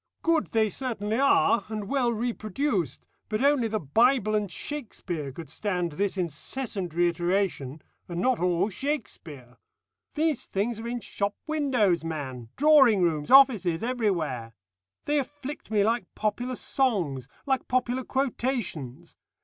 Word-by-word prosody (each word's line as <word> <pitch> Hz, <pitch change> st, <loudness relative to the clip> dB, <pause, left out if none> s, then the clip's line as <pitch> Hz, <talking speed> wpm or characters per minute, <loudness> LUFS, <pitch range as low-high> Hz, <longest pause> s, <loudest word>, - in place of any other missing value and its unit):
"Good 330 Hz, -2 st, +2 dB
they 220 Hz, -2 st, +1 dB
certainly 225 Hz, -3 st, -2 dB
are, 275 Hz, -3 st, +4 dB
and 215 Hz, -2 st, -5 dB
well 255 Hz, -1 st, +1 dB
reproduced, 215 Hz, -, -2 dB, 0.2 s
but 215 Hz, +4 st, -1 dB
only 280 Hz, -5 st, +3 dB
the 215 Hz, 0 st, -1 dB
Bible 220 Hz, -, +3 dB
and 210 Hz, -3 st, 0 dB
Shakspeare 175 Hz, -, -5 dB
could 160 Hz, +4 st, -9 dB
stand 180 Hz, +2 st, -2 dB
this 195 Hz, +5 st, -1 dB
incessant 180 Hz, -, -4 dB
reiteration, 175 Hz, -4 st, 0 dB, 0.3 s
and 170 Hz, -1 st, -3 dB
not 255 Hz, +5 st, +2 dB
all 180 Hz, +2 st, +1 dB
Shakspeare. 165 Hz, -, -5 dB, 0.6 s
These 310 Hz, -3 st, 0 dB
things 215 Hz, +3 st, -1 dB
are 230 Hz, -, -5 dB
in 240 Hz, 0 st, -3 dB
shop 200 Hz, -1 st, -2 dB
windows, 255 Hz, -, +1 dB
man 135 Hz, -7 st, -5 dB
drawing 270 Hz, -9 st, +6 dB
rooms, 155 Hz, -4 st, 0 dB
offices, 225 Hz, -11 st, +6 dB
everywhere. 170 Hz, -, -1 dB, 0.5 s
They 295 Hz, 0 st, +2 dB
afflict 290 Hz, +1 st, -6 dB
me 210 Hz, -2 st, +3 dB
like 230 Hz, +3 st, 0 dB
popular 240 Hz, +4 st, -2 dB
songs 180 Hz, -, 0 dB, 0.2 s
like 265 Hz, -3 st, 0 dB
popular 255 Hz, 0 st, 0 dB
quotations. 230 Hz, -, -3 dB
215 Hz, 130 wpm, -27 LUFS, 175-255 Hz, 0.6 s, drawing